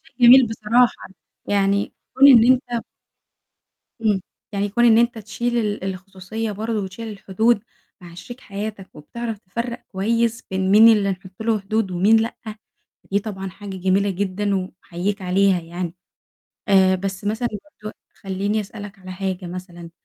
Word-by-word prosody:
شيء -, -, -24 dB
جميل 245 Hz, +1 st, +8 dB
بصراحة 225 Hz, +2 st, +1 dB, 0.4 s
يعني 200 Hz, 0 st, +1 dB, 0.2 s
كون 275 Hz, +2 st, +7 dB
إن 245 Hz, -1 st, +8 dB
أنت 245 Hz, -2 st, -2 dB, 1.2 s
إمم، 205 Hz, -3 st, +2 dB, 0.3 s
يعني 200 Hz, 0 st, -1 dB
كون 240 Hz, +4 st, +1 dB
إن 225 Hz, -2 st, +6 dB
أنت 235 Hz, 0 st, +2 dB
تشيل 235 Hz, +3 st, -2 dB
ال 210 Hz, -3 st, -2 dB
الخصوصية 190 Hz, +3 st, -5 dB
برضه 220 Hz, +2 st, -3 dB
وتشيل 195 Hz, +4 st, -7 dB
الحدود 210 Hz, +2 st, 0 dB, 0.4 s
مع 175 Hz, -2 st, -12 dB
شريك 245 Hz, +8 st, -10 dB
حياتك، 200 Hz, -1 st, -6 dB
وبتعرف 225 Hz, +9 st, -6 dB
تفرّق 235 Hz, +5 st, -5 dB
كويس 230 Hz, +3 st, 0 dB
بين 190 Hz, 0 st, 0 dB
مين 215 Hz, +3 st, +8 dB
اللي 205 Hz, -3 st, +4 dB
نحطّ 190 Hz, +2 st, -7 dB
له 220 Hz, -1 st, +1 dB
حدود 200 Hz, 0 st, -1 dB
ومين 195 Hz, +5 st, +4 dB
لأ، 225 Hz, +2 st, 0 dB, 0.8 s
دي 200 Hz, -, +2 dB
طبعًا 195 Hz, -2 st, -6 dB
حاجة 195 Hz, 0 st, -8 dB
جميلة 190 Hz, +2 st, +1 dB
جدًا 200 Hz, +2 st, -1 dB
وباحييك 190 Hz, +1 st, -4 dB
عليها 185 Hz, 0 st, +2 dB
يعني، 170 Hz, +1 st, -6 dB, 0.7 s
آآ 190 Hz, -1 st, +5 dB
بس 190 Hz, +1 st, -4 dB
مثلًا 220 Hz, +4 st, -1 dB, 0.3 s
برضه 215 Hz, -, -6 dB, 0.3 s
خلّيني 200 Hz, +2 st, -1 dB
أسألك 205 Hz, 0 st, -9 dB
على 185 Hz, -1 st, -9 dB
حاجة 190 Hz, -1 st, -4 dB
مثلًا، 175 Hz, -1 st, -8 dB
200 Hz, 145 wpm, -21 LUFS, 190-225 Hz, 1.2 s, جميل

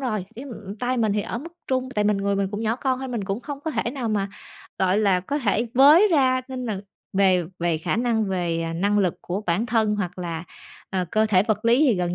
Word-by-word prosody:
rồi, 215 Hz, -8 st, -2 dB
cái, 255 Hz, +5 st, -8 dB
ừm, 210 Hz, -5 st, -8 dB
tay 250 Hz, +3 st, -1 dB
mình 220 Hz, -3 st, +2 dB
thì 210 Hz, -, +1 dB
ở 235 Hz, -, -4 dB
mức 335 Hz, +5 st, -9 dB
trung. 260 Hz, -1 st, -1 dB
Tại 210 Hz, 0 st, +1 dB
mình 210 Hz, -1 st, +3 dB
người 200 Hz, 0 st, 0 dB
mình 195 Hz, -1 st, 0 dB
cũng 205 Hz, +1 st, -4 dB
nhỏ 225 Hz, +2 st, 0 dB
con 260 Hz, -1 st, -1 dB
thôi 265 Hz, 0 st, -5 dB
mình 230 Hz, -5 st, -3 dB
cũng 195 Hz, +4 st, -3 dB
không 285 Hz, -1 st, -7 dB
có 315 Hz, -, -3 dB
thể 235 Hz, -, -1 dB
nào 250 Hz, -4 st, -3 dB
mà, 200 Hz, -2 st, 0 dB, 0.5 s
gọi 190 Hz, +2 st, +2 dB
là, 195 Hz, -4 st, +3 dB
có 285 Hz, +11 st, -2 dB
thể 230 Hz, -1 st, +1 dB
với 300 Hz, +10 st, +7 dB
ra 260 Hz, -3 st, +3 dB
nên 255 Hz, -1 st, -5 dB
là 200 Hz, -3 st, -3 dB, 0.3 s
về 190 Hz, -3 st, +3 dB
về 170 Hz, -2 st, 0 dB
khả 160 Hz, -, -1 dB
năng 230 Hz, -2 st, +1 dB
về, 175 Hz, -3 st, -1 dB
à, 165 Hz, 0 st, -3 dB
năng 200 Hz, +5 st, +1 dB
lực 185 Hz, -4 st, +2 dB
của 185 Hz, +3 st, -3 dB
bản 180 Hz, +8 st, +1 dB
thân 220 Hz, -2 st, +1 dB
hoặc 180 Hz, -3 st, -4 dB
là, 170 Hz, -1 st, -4 dB, 0.5 s
ờ, 185 Hz, -1 st, 0 dB
cơ 215 Hz, 0 st, +3 dB
thể 190 Hz, -3 st, +4 dB
vật 215 Hz, 0 st, -1 dB
lý 235 Hz, +4 st, +4 dB
thì 265 Hz, -8 st, +4 dB
gần 175 Hz, -1 st, -1 dB
210 Hz, 255 wpm, -24 LUFS, 190-250 Hz, 0.5 s, với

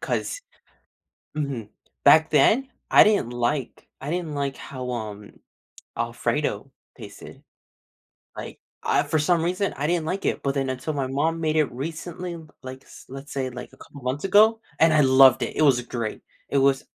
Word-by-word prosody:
'cause -, -, -3 dB, 1.0 s
Mhm. 135 Hz, -8 st, -3 dB, 0.4 s
Back 160 Hz, 0 st, +6 dB
then, 250 Hz, -, +4 dB, 0.2 s
I -, -, +8 dB
didn't 210 Hz, -, +2 dB
like 120 Hz, +2 st, -2 dB
I 140 Hz, -, -5 dB
didn't 170 Hz, -2 st, -3 dB
like 140 Hz, -1 st, -3 dB
how, 130 Hz, -2 st, -7 dB
um, 105 Hz, -3 st, -7 dB, 0.6 s
Alfredo -, -, -2 dB, 0.3 s
tasted. -, -, -12 dB, 1.0 s
Like, -, -, -8 dB, 0.2 s
I -, -, +2 dB
for 155 Hz, -, -1 dB
some 165 Hz, +2 st, +2 dB
reason, 185 Hz, +4 st, -1 dB
I 145 Hz, -, -1 dB
didn't 170 Hz, -1 st, 0 dB
like 190 Hz, +4 st, -3 dB
it. -, -, -1 dB
But 135 Hz, -1 st, -1 dB
then 135 Hz, -2 st, -1 dB
until 130 Hz, +4 st, -4 dB
my 135 Hz, -2 st, -1 dB
mom 150 Hz, +5 st, -1 dB
made 155 Hz, -1 st, 0 dB
it 155 Hz, -3 st, +2 dB
recently, 165 Hz, +6 st, -6 dB, 0.3 s
like, 130 Hz, 0 st, -9 dB, 0.2 s
let's 135 Hz, +2 st, -9 dB
say, 130 Hz, -2 st, -2 dB
like, 125 Hz, 0 st, -9 dB
a -, -, -17 dB
couple 140 Hz, -3 st, -14 dB
months 130 Hz, +7 st, -3 dB
ago, 215 Hz, +3 st, +5 dB, 0.2 s
and 165 Hz, 0 st, +5 dB
I 155 Hz, -, +5 dB
loved 130 Hz, -1 st, +6 dB
it. -, -, -3 dB
It -, -, +2 dB
was 135 Hz, -5 st, +4 dB
great. 115 Hz, -2 st, -5 dB, 0.3 s
It 140 Hz, -, +1 dB
was 135 Hz, 0 st, +2 dB
140 Hz, 170 wpm, -24 LUFS, 130-165 Hz, 1.0 s, I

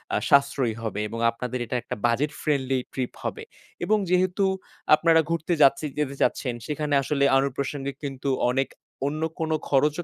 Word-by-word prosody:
আ -, -, +3 dB
সাশ্রয়ী 140 Hz, -4 st, +3 dB
হবে। 105 Hz, -2 st, -3 dB
এবং 115 Hz, +2 st, -6 dB
আপনাদের 125 Hz, +2 st, -4 dB
এটা 120 Hz, -, -4 dB
একটা -, -, -5 dB
budget 130 Hz, +5 st, +1 dB
friendly 135 Hz, -3 st, +1 dB
trip 130 Hz, -2 st, -2 dB
হবে। 445 Hz, -, -4 dB, 0.4 s
এবং 215 Hz, -, +3 dB
যেহেতু 185 Hz, +2 st, +2 dB, 0.5 s
আপনারা 165 Hz, +1 st, +4 dB
ঘুরতে 170 Hz, +1 st, 0 dB
যাচ্ছে 140 Hz, +2 st, +5 dB
যেতে 140 Hz, -2 st, -1 dB
চাচ্ছেন 125 Hz, -3 st, +1 dB
সেখানে 150 Hz, -1 st, -2 dB
আসলে 140 Hz, 0 st, 0 dB
অনুপ্রাশনংগিক 140 Hz, 0 st, -1 dB
কিন্তু 135 Hz, 0 st, -3 dB, 0.2 s
অনেক 135 Hz, +1 st, +1 dB, 0.4 s
অন্য 155 Hz, +2 st, -3 dB, 0.2 s
কোন 160 Hz, -1 st, -1 dB, 0.2 s
খরচও 150 Hz, +4 st, +2 dB
140 Hz, 155 wpm, -25 LUFS, 130-155 Hz, 0.5 s, যাচ্ছে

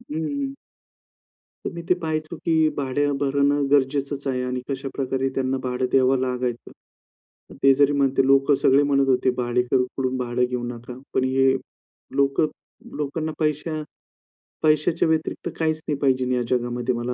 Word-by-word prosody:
हं, 155 Hz, -11 st, -8 dB
हं, 160 Hz, -, -2 dB, 0.2 s
हं. 275 Hz, 0 st, -4 dB, 1.1 s
तर -, -, -2 dB
मी 170 Hz, -, -6 dB
ते -, -, +5 dB
पाहायचो 155 Hz, +1 st, -3 dB
की 165 Hz, -, +1 dB, 0.2 s
भाडे 140 Hz, +1 st, 0 dB
भरण 140 Hz, 0 st, +2 dB, 0.2 s
गरजेचंच 140 Hz, 0 st, +1 dB
आहे 130 Hz, -2 st, 0 dB
आणि 125 Hz, 0 st, -2 dB
कशाप्रकारे 135 Hz, 0 st, -2 dB
त्यांना 130 Hz, 0 st, 0 dB
भाडं 125 Hz, 0 st, -1 dB
द्यावं 130 Hz, 0 st, +4 dB
लागायचं. 125 Hz, -2 st, -3 dB, 0.9 s
ते 135 Hz, -, +7 dB
जरी 145 Hz, +1 st, +4 dB
म्हणते 135 Hz, -1 st, +2 dB
लोकं 135 Hz, +1 st, +4 dB
सगळे 135 Hz, +2 st, +5 dB
म्हणत 140 Hz, -1 st, +2 dB
होते 130 Hz, 0 st, +3 dB
भाडेकरू 125 Hz, +1 st, +1 dB
कडून 130 Hz, -1 st, 0 dB
भाडं 125 Hz, 0 st, -1 dB
घेऊ 125 Hz, 0 st, -2 dB
नका. 120 Hz, +1 st, -7 dB, 0.2 s
पण 130 Hz, -, +2 dB
हे 130 Hz, 0 st, +3 dB, 0.6 s
लोक 140 Hz, 0 st, +2 dB, 0.6 s
लोकांना 155 Hz, +2 st, -2 dB
पैशा 155 Hz, +1 st, -1 dB, 0.8 s
पैशाच्या 155 Hz, +2 st, +3 dB
व्यतिरिक्त 160 Hz, 0 st, -1 dB
काहीच 155 Hz, -1 st, +1 dB
नाही 150 Hz, -, -1 dB
पाहिजे 130 Hz, -2 st, +1 dB
या 125 Hz, -, +1 dB
जगामध्ये 120 Hz, 0 st, 0 dB
मला 120 Hz, +1 st, -2 dB
135 Hz, 150 wpm, -23 LUFS, 125-145 Hz, 1.1 s, ते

